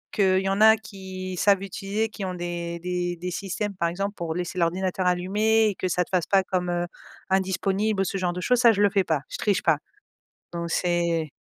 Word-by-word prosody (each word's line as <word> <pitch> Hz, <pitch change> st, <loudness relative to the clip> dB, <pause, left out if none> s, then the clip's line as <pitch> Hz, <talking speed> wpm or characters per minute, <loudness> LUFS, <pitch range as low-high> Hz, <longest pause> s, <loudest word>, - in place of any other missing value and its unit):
Qu'il 190 Hz, -3 st, +3 dB
y 195 Hz, -, 0 dB
en 195 Hz, +2 st, 0 dB
a 220 Hz, 0 st, +8 dB
qui 190 Hz, -3 st, -7 dB
savent 195 Hz, +1 st, +3 dB
utiliser 200 Hz, +2 st, -2 dB
qui 215 Hz, -2 st, -8 dB
ont 185 Hz, -1 st, -3 dB
des 175 Hz, -1 st, -4 dB
des 175 Hz, 0 st, -2 dB
des 180 Hz, +1 st, -5 dB
systèmes, 200 Hz, +3 st, -3 dB
par 170 Hz, -2 st, 0 dB
exemple, 195 Hz, +4 st, -3 dB
pour 170 Hz, -5 st, -4 dB
laisser 180 Hz, +1 st, -3 dB
l'ordinateur 180 Hz, +2 st, 0 dB
allumé 210 Hz, +5 st, +2 dB
et -, -, -2 dB
que 185 Hz, -, -3 dB
ça 180 Hz, 0 st, +1 dB
te -, -, -17 dB
fasse 180 Hz, -3 st, 0 dB
pas 195 Hz, -1 st, +4 dB
comme, 180 Hz, -1 st, -2 dB
heu, 175 Hz, 0 st, 0 dB, 0.5 s
indisponible 195 Hz, +2 st, +1 dB
ou -, -, +3 dB
ce 195 Hz, +1 st, -2 dB
genre 180 Hz, -1 st, 0 dB
de 180 Hz, -, -5 dB
choses, 250 Hz, +5 st, +2 dB
ça 235 Hz, -2 st, +7 dB
je 205 Hz, -, 0 dB
le 200 Hz, -, +4 dB
fais 195 Hz, -2 st, +2 dB
pas 160 Hz, -5 st, 0 dB
je -, -, -6 dB
triche 205 Hz, -3 st, +1 dB
pas 160 Hz, -3 st, +3 dB, 0.7 s
donc 170 Hz, -1 st, -4 dB
c'est 170 Hz, -2 st, +1 dB
185 Hz, 225 wpm, -25 LUFS, 175-200 Hz, 0.7 s, a